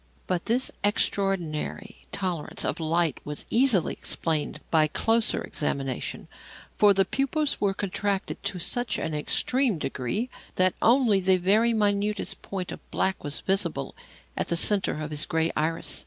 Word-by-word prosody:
But 180 -2 -1
this 245 +3 +1
extraordinary 195 -1 -1
tolerance 180 -5 -2
of - - -2
light 165 -2 +1
was 150 0 -6
easily 235 - +3
explained 155 -3 -2
by 155 -2 +4
closer 225 +8 +2
examination; 135 -4 -3 0.5
for 205 -1 +6
the 195 -1 +3
pupils 275 +6 0
were 195 -2 +1
contracted 200 0 -2
to 200 -2 -1
such 230 +5 0
an 160 - -3
extreme 240 - 0
degree 150 - -2 0.2
that 185 0 +3
only 235 -4 +4
the 185 0 +4
very 215 +6 +3
minutest 205 -1 0
point 190 -2 -5
of - - -7
black 190 0 -1
was 145 0 -2
visible 195 +1 0 0.4
at - - -2
the 170 - 0
centre 195 -4 +2
of 155 0 -5
the 150 0 0
grey 160 0 +1
iris. 160 +2 -1
195 Hz, 145 wpm, -26 LUFS, 160-210 Hz, 0.5 s, for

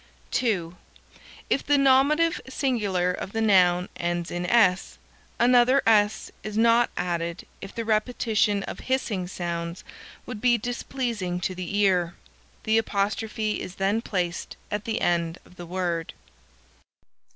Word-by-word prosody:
(2) 180 -8 0 0.7
If - - +1
the 290 0 +3
nominative 280 +5 +3
singular 205 -10 0
of 185 - -6
the 225 - -1
noun 180 -4 +4
ends 175 0 -2
in 175 0 -3
"s," 190 -4 +3 0.4
another 250 +2 +4
"s" 210 -1 +3
is 215 0 -5
not 235 +1 +4
added 170 -1 -2 0.2
if 195 - -9
the 230 - -3
repetition 215 -2 +1
of - - -7
hissing 225 -8 -1
sounds 170 -1 -4 0.4
would 220 -4 -7
be 245 -1 +4
displeasing 235 -5 -3
to 185 - -1
the 185 +2 -4
ear. 180 -4 +2 0.5
The 220 +1 +3
apostrophe 215 +1 -1
is 185 - -7
then 200 +4 0
placed 180 -6 -3
at 210 0 -3
the 225 -1 -2
end 170 -1 0
of 180 - -19
the 175 - -8
word. 175 -2 -3
205 Hz, 135 wpm, -25 LUFS, 180-235 Hz, 0.7 s, noun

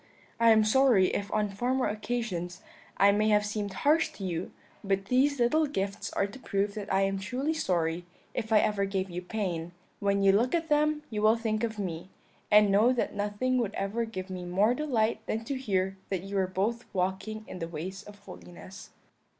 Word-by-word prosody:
I 230 0 +5
am 220 -1 +6
sorry 215 -4 +4
if 200 0 -3
on 210 -1 +1
former 250 +6 0
occasions 210 -5 -3 0.3
I 200 +1 +6
may 210 +2 +2
have 210 -1 +3
seemed 205 -1 -3
harsh 310 +3 +4
to 195 - -9
you, 175 -1 -3 0.3
but 195 -1 0
these 280 +2 +3
little 305 +6 +3
gifts 200 -6 -3
are - - +1
to 200 +6 -9
prove 200 -4 -1
that 205 -1 -6
I 195 0 +3
am 195 0 0
truly 255 +10 -2
sorry 175 - -1 0.3
if 225 -2 -4
ever 210 -1 +3
I - - +3
gave 195 -1 -2
you 175 +1 -4
pain; 180 -4 -3 0.3
when 200 0 +1
you 195 - +6
look 235 - +2
at 325 -1 -2
them 300 0 +2
you 210 -1 -2
will 215 +2 +5
think 220 -1 -1
of 220 -2 -2
me, 180 -3 -4 0.4
and 210 -1 +6
know 215 +5 +5
that 250 - -1
nothing 210 +5 0
would 215 -4 -2
ever 205 +4 -1
give 190 -4 -7
me 180 -1 -5
more 195 +6 +2
delight 230 -6 0
than 225 +1 -2
to 280 - -3
hear 195 -6 -1
that 190 -2 -2
you 195 +1 -6
were 190 -1 +2
both 210 +6 -2
walking 190 +4 -2
in 180 - -8
the 165 - -3
ways 175 +4 -6
of 210 0 -13
holiness.' 185 -1 -12
205 Hz, 200 wpm, -29 LUFS, 190-235 Hz, 0.4 s, am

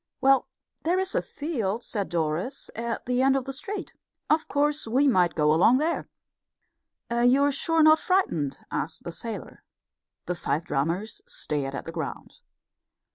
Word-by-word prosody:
"Well, 270 0 +4 0.3
there's 370 +3 0
a - - +2
field," 235 - -3
said 205 -4 -3
Doris, 170 - -2
"at 230 0 -3
the 250 0 +1
end 270 0 +4
of 265 -2 -1
the 270 - -5
street. 385 +8 -6 0.4
Of 310 +1 +2
course, 295 -1 +1
we 265 +6 +3
might 180 -9 +3
go 150 -1 +3
along 190 +10 +5
there." 315 +4 -1 1.0
"You're 250 +4 +4
sure 325 +4 0
you're 320 - +6
not 310 0 +7
frightened?" 165 - +1
asked - - -3
the - - -5
sailor. - - -7 0.6
The 180 - -1
five 170 -2 -1
drummers 170 +8 -2
still - - -22
stared 140 -2 -3
at - - -5
the 165 - -5
ground. 160 -4 -6
245 Hz, 160 wpm, -26 LUFS, -, 1.0 s, not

